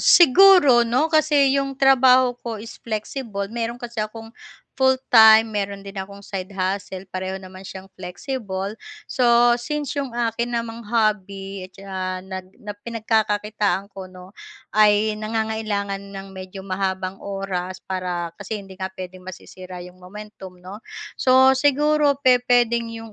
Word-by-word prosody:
siguro 345 -7 +7
'no 255 +7 +1
kasi 290 -3 +4
yung 275 -1 -4
trabaho 260 -2 +5
ko 230 -2 -5
is 225 - -10
flexible 215 -2 -4
meron 235 0 -3
kasi 235 -2 -5
akong 225 +1 -6 0.4
full-time, 225 -4 +6
meron 200 -2 -3
din 195 0 -11
akong 200 +1 -7
side 195 -1 -6
hustle 190 0 -3
pareho 190 +1 -5
naman 185 0 -12
siyang 190 0 -9
flexible. 195 +1 -5 0.3
So, 240 -1 +4
since 295 +3 -4
'yong 275 -4 -3
akin 235 0 -2
namang 230 0 -4
hobby 200 -3 -1 0.2
na 185 -1 -4
nag 190 -1 -7 0.4
pinagkakakitaan 210 -3 -1
ko 190 -1 -8
'no, 185 +1 -14 0.4
ay 210 0 +4
nangangailangan 215 -2 -2
ng 195 0 -8
medyo 190 0 -9
mahabang 190 0 -3
oras 190 -2 -4
para 180 -2 -3
kasi 205 +1 -5
hindi 195 -1 -13
nga 190 0 -5
puwedeng 185 0 -9
masisira 185 0 -10
'yong 180 0 -11
momentum, 190 -1 -11
'no. 195 +5 -11 0.3
So, 260 +1 +5
siguro 295 +1 +3
pe 250 -2 +4
pwedeng 235 -1 +2
yung 225 -1 -11
210 Hz, 135 wpm, -22 LUFS, 190-240 Hz, 0.4 s, siguro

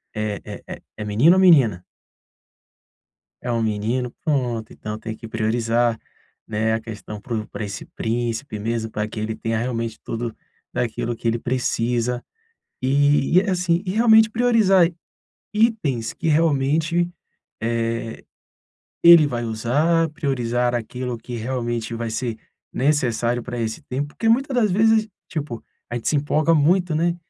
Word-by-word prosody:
é 105 -1 -2 0.3
é - - -8 0.2
é 105 - -5
menino 115 - +5
ou - - +3
menina? 130 - +5 1.6
É 120 - -3
um 115 -1 0
menino. 110 +3 -1
Pronto. 125 -8 -1
Então 105 0 -6
tem 110 0 -6
que 115 - -10
priorizar, 115 +1 +1 0.5
né? 110 +1 0
A 115 - -1
questão 105 -1 -8
pro 110 -1 -4
pra 110 - -5
esse 100 -1 -6
príncipe 115 +1 -3
mesmo 110 +1 -2
pra 105 -1 -2
que 110 0 -6
ele 110 +1 -2
tenha 115 0 -2
realmente 115 -1 -3
tudo 115 0 -4 0.4
daquilo 120 0 -2
que 115 - -7
ele 115 +1 +1
precisa, 120 0 -1 0.6
eh, - - 0
e 145 +4 +4
é 200 +1 -1
assim, 180 -1 +1
e 185 - -3
realmente 220 +1 +5
priorizar 220 -6 +4
i 170 - -6 0.6
itens 210 - +1
que - - -4
realmente, 160 +2 +2 0.5
eh, 115 0 -2 0.8
ele 170 -3 +9
vai 120 -4 -3
usar, 145 +9 +1
priorizar 125 -5 -1
aquilo 125 +1 -3
que 120 +2 -8
realmente 120 -1 -3
vai 115 0 -3
ser 115 0 -3 0.4
necessário 120 -4 +1
pra 120 0 -6
esse 110 +2 -3
tempo, 140 +1 -3
porque 225 +9 -2
muita 270 +5 +2
das 235 -5 +2
vezes, 220 +3 +3 0.2
tipo, 145 -8 -5 0.3
a - - -4
gente 120 - -2
se 150 - +2
empolga 150 +3 +2
muito, 170 +3 +3
né? 170 +2 +1
120 Hz, 150 wpm, -22 LUFS, 115-165 Hz, 1.6 s, ele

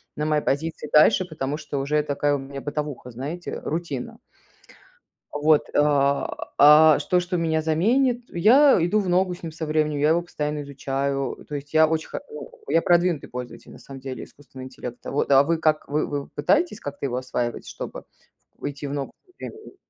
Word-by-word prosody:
на 150 - -2
моей 155 -1 +1
позиции 150 +1 -2
дальше, 185 +5 +5
потому 150 -4 -4
что 150 -3 -5
уже 150 +2 +1
такая 145 0 0
у - - -1
меня 135 0 -8
бытовуха, 145 -4 -5
знаете, 145 +9 -6
рутина. 155 -5 -5 1.1
Вот, 150 +1 +3
а, 140 -1 +1
а 150 +2 +8
что 180 -1 +1
что 180 +1 -3
меня 160 -1 0
заменит- 235 - +1
я 250 +11 +5
иду 210 +5 +2
в 190 - -3
ногу 180 0 +2
с 175 - -14
ним, 165 - -6
со 160 0 -5
временем, 155 -1 0
я 150 +2 +3
его 170 +1 +2
постоянно 150 -3 -4
изучаю, 135 0 -3
то 150 - -6
есть 145 +2 -7
я 160 0 +6
очень 160 0 -2
хо - - -4 0.5
я 165 - +3
продвинутый 175 -3 +2
пользователь, 125 0 -8
на - - -12
самом 135 -1 -11
деле, 130 -1 -6
искусственного 130 -2 -12
интеллекта. 125 -2 -8
Вот. 140 - -1
А 135 +1 +6
вы 165 +1 0
как, 155 -1 +1
вы 150 +2 0
вы 145 -1 -4
пытаетесь 210 - +1
как-то 145 0 -5
его 125 - -3
осваивать, 125 -2 -3
чтобы - - -7 0.5
в 145 - -4
идти 140 +1 -8
в 140 - -5
ногу 140 -2 -4
со 365 - -26
временем? 430 -2 -10
150 Hz, 185 wpm, -24 LUFS, 140-165 Hz, 1.1 s, а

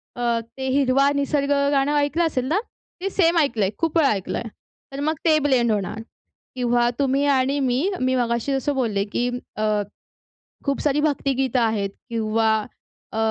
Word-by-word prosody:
अ, 235 -1 0 0.2
ते 265 0 -3
हिरवा 275 +1 +3
निसर्ग 280 0 0 0.2
गाणं 280 +1 +2
ऐकलं 290 +4 +1
असेल 260 -6 -1
ना, 320 +9 +1 0.4
ते 390 - -1
सेम 345 -3 +2
ऐकलंय, 235 -10 +2
खूप 330 0 0
वेळा 300 -4 +4
ऐकलंय, 195 +1 -3 0.5
तर 275 - -5
मग 310 +2 +1
ते 315 -2 +5
ब्लेंड 260 -5 +2
होणार. 210 +1 -2 0.6
किंवा 240 -1 +2
तुम्ही 275 +1 +2
आणि 270 +2 +1
मी, 255 0 +1 0.2
मी 255 0 +1
मगाशी 235 +2 0
जसं 270 +2 -1
बोलले 220 -7 0
की 245 +1 0 0.3
अ, 215 - -1 1.0
खूप 280 -1 0
सारी 295 0 +1
भक्तिगीत 270 -3 0
आहेत 220 -4 0 0.2
किंवा 220 -1 +1 0.6
अ, 220 - -5
265 Hz, 160 wpm, -23 LUFS, 235-285 Hz, 1.0 s, ते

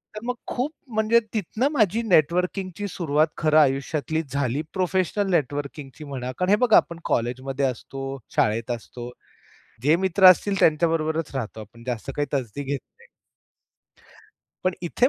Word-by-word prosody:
तर - - -4
मग 250 0 -1
खूप 265 +5 -2 0.2
म्हणजे 220 +2 +4
तिथनं 220 +4 0
माझी 220 - +2
नेटवर्किंगची 180 +2 +1
सुरुवात 155 -3 +1
खरं 155 0 +3
आयुष्यातली 145 +3 +1
झाली 140 0 0
प्रोफेशनल 190 +1 0
नेटवर्किंगची 145 -1 -2
म्हणा, 130 -3 -5
कारण 180 0 0
हे 205 - +6
बघा 235 -3 +7
आपण 170 -1 +1
कॉलेजमध्ये 130 +3 -1
असतो, 135 +2 -4 0.3
शाळेत 115 +3 +1
असतो. 120 +1 -6 0.7
जे 150 +5 +4
मित्र 190 +1 +4
असतील 195 +2 +2
त्यांच्याबरोबरच 160 -1 +2
राहतो 110 -3 -4
आपण. 115 +2 -13
जास्त 125 +1 -3
काही 145 - 0
तसदी 130 +1 -3
घेत 140 +1 -2 0.2
नाही. 475 - -19 1.6
पण 185 - +2
इथे 210 +8 +2
155 Hz, 140 wpm, -24 LUFS, 135-190 Hz, 1.6 s, बघा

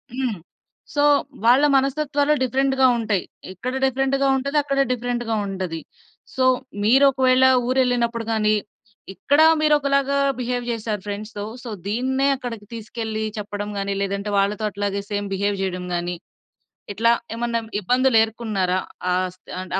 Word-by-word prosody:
హ్మ్. 250 -7 -2 0.6
సో, 290 - +3 0.4
వాళ్ళ 250 +4 +6
మనస్తత్వాలు 285 +2 +1
డిఫరెంట్‌గా 265 0 +2
ఉంటయి. 215 -5 0 0.3
ఇక్కడ 250 +8 -5
డిఫరెంట్‌గా 270 +1 +1
ఉంటది, 280 +3 -2
అక్కడ 275 -1 -1
డిఫరెంట్‌గా 240 -2 -2
ఉంటది. 185 -4 -4 0.6
సో, 260 - +1 0.4
మీరొకవేళా 260 +2 +5 0.2
ఊరెళ్ళినప్పుడు 245 -3 +1
గానీ, 215 -1 +2 0.6
ఇక్కడా 285 +9 +3 0.2
మీరొకలాగా 280 -2 +2 0.2
బిహేవ్ 245 0 -2
జేశారు 220 -3 -3
ఫ్రెండ్స్‌తో. 205 0 -5 0.2
సో, 245 - -7 0.2
దీన్నే 260 +5 0
అక్కడికి 230 -5 -7
తీసుకెళ్లి 220 -1 -4 0.2
చెప్పడం 205 0 -5
గానీ, 195 0 -2
లేదంటే 200 +1 -2
వాళ్ళతో 205 +2 0
అట్లాగే 200 0 -2
సేమ్ 205 0 -2
బిహేవ్ 200 0 -1
జెయడం 180 -1 -3
గానీ, 175 0 -2 0.8
ఇట్లా 230 +3 +3 0.2
ఏమన్నా 235 0 -1 0.2
ఇబ్బందులు 250 +4 +2
ఏరుకున్నారా 210 -5 -1 0.3
ఆ - - +2 0.2
స్థి - - -18
అంటె 185 - -7
235 Hz, 125 wpm, -22 LUFS, 205-265 Hz, 0.8 s, వాళ్ళ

